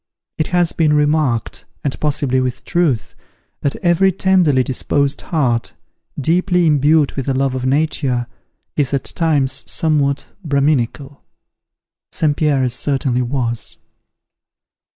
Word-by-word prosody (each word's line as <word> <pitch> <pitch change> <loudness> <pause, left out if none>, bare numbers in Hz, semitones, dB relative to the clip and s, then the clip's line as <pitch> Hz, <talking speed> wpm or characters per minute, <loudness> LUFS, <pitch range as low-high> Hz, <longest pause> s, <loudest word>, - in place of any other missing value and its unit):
It 155 - +1
has 175 -2 +1
been 155 -2 +2
remarked, 150 -5 0 0.2
and 140 - -2
possibly 140 -3 0
with 125 -1 -3
truth, 160 -10 0 0.5
that 140 - -1
every 180 +2 +3
tenderly 180 -8 +3
disposed 140 +2 0
heart, 125 -8 -1 0.5
deeply 175 +4 +2
imbued 150 0 +3
with 135 0 -4
a 135 - 0
love 135 0 0
of 130 0 -2
Nature, 135 -3 0 0.5
is 140 -2 +1
at 135 - -3
times 145 -5 0
somewhat 145 -3 0 0.2
Braminical. 140 -2 0 0.9
St. 150 -2 +1
Pierre's 135 -6 +1
certainly 130 -2 0
was. 120 -2 -3
145 Hz, 115 wpm, -18 LUFS, 130-155 Hz, 0.9 s, every